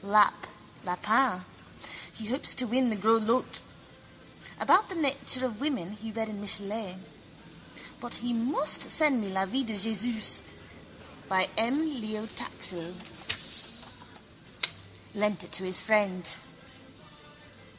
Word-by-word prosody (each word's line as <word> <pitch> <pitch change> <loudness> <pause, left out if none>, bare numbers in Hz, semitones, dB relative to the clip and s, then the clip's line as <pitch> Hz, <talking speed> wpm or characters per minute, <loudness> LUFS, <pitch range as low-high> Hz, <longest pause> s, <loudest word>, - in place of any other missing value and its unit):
Lap, 205 +1 +3 0.4
lapin. 210 +2 0 0.7
He 220 - -7
hopes 255 +6 +2
to 255 - +5
win 250 +3 +1
in - - +1
the 220 - -1
gros 220 +3 +3
lots. 230 +4 -1 1.0
About 390 +4 +4
the 380 - -6
nature 275 -4 +3
of 235 -2 -6
women 265 - -2
he 215 +1 -8
read 225 0 -3
in 210 -2 -7
Michelet. 205 -1 0 1.0
But 240 -1 -2
he 245 0 -1
must 255 +6 +2
send 295 -6 +6
me 200 - -4
La 190 0 -1
Vie 260 +8 -2
de 225 -3 -4
Jésus 220 +2 +1 0.9
by 190 -1 +3
M. 265 +8 +1
Léo 215 0 -5
Taxil. 175 -1 -2 2.2
Lent 210 -2 -1
it - - -14
to 190 - +2
his 185 0 +2
friend. 200 -5 +1
220 Hz, 125 wpm, -28 LUFS, 200-250 Hz, 2.2 s, send